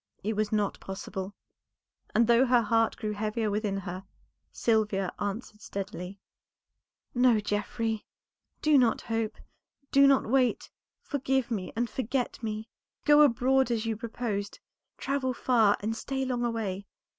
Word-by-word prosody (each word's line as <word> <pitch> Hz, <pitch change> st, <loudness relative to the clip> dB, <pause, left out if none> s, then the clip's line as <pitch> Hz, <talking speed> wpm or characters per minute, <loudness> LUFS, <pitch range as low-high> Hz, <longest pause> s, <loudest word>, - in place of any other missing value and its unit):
It 215 Hz, +3 st, 0 dB
was 215 Hz, 0 st, -1 dB
not 210 Hz, -2 st, 0 dB
possible; 190 Hz, 0 st, -6 dB, 0.8 s
and 235 Hz, -, +5 dB
though 235 Hz, +3 st, +5 dB
her 245 Hz, -1 st, +4 dB
heart 225 Hz, +1 st, +2 dB
grew 215 Hz, -, -3 dB
heavier 215 Hz, +1 st, -1 dB
within 205 Hz, -1 st, -1 dB
her, 185 Hz, 0 st, -6 dB, 0.5 s
Sylvia 210 Hz, -4 st, +1 dB
answered 210 Hz, +1 st, -4 dB
steadily 195 Hz, -2 st, -6 dB, 1.0 s
"No, 245 Hz, -3 st, +4 dB
Geoffrey, 210 Hz, +2 st, -2 dB, 0.6 s
do 300 Hz, -2 st, +6 dB
not 240 Hz, -3 st, +2 dB
hope, 225 Hz, -1 st, -2 dB, 0.6 s
do 275 Hz, 0 st, +7 dB
not 275 Hz, -1 st, +4 dB
wait; 255 Hz, 0 st, +1 dB, 0.3 s
forgive 265 Hz, -3 st, -1 dB
me 195 Hz, -5 st, -2 dB
and 235 Hz, +2 st, 0 dB
forget 250 Hz, +2 st, -2 dB
me. 215 Hz, -1 st, -4 dB, 0.4 s
Go 295 Hz, 0 st, +7 dB
abroad 265 Hz, -1 st, +4 dB
as 230 Hz, -1 st, -1 dB
you 225 Hz, -1 st, -1 dB
proposed; 215 Hz, -2 st, -4 dB, 0.4 s
travel 260 Hz, -2 st, -1 dB
far 225 Hz, -6 st, +3 dB
and 220 Hz, +2 st, -2 dB
stay 265 Hz, +3 st, -3 dB
long 250 Hz, -2 st, -1 dB
away. 205 Hz, -5 st, -2 dB
225 Hz, 135 wpm, -29 LUFS, 205-250 Hz, 1.0 s, do